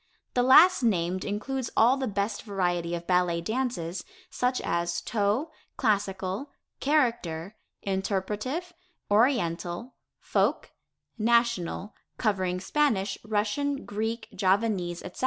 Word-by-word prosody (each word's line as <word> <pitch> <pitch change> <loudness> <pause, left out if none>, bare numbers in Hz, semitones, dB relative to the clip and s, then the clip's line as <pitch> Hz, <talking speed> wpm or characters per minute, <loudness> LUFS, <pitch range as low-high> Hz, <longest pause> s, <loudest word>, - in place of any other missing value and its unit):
The 250 - +3
last 310 +9 +7
named 185 -5 +1
includes 235 +5 -3
all 240 +4 +6
the 265 -1 -2
best 200 0 -2
variety 175 -4 -1
of 170 0 -6
ballet 180 -2 +2
dances, 195 -4 -2 0.3
such 250 +1 0
as 170 0 -1
toe, 215 - 0 0.3
classical, 200 +1 -1 0.3
character, 230 - 0 0.3
interpretive, 210 - -2 0.4
oriental, 205 -2 +1 0.3
folk, - - 0 0.5
national, 230 -4 +1 0.2
covering 185 -5 0
Spanish, 200 -3 0
Russian, 220 +7 -1
Greek, 220 +2 -3
Javanese, 190 -2 0
etc. 180 - -9
205 Hz, 100 wpm, -27 LUFS, 185-245 Hz, 0.5 s, last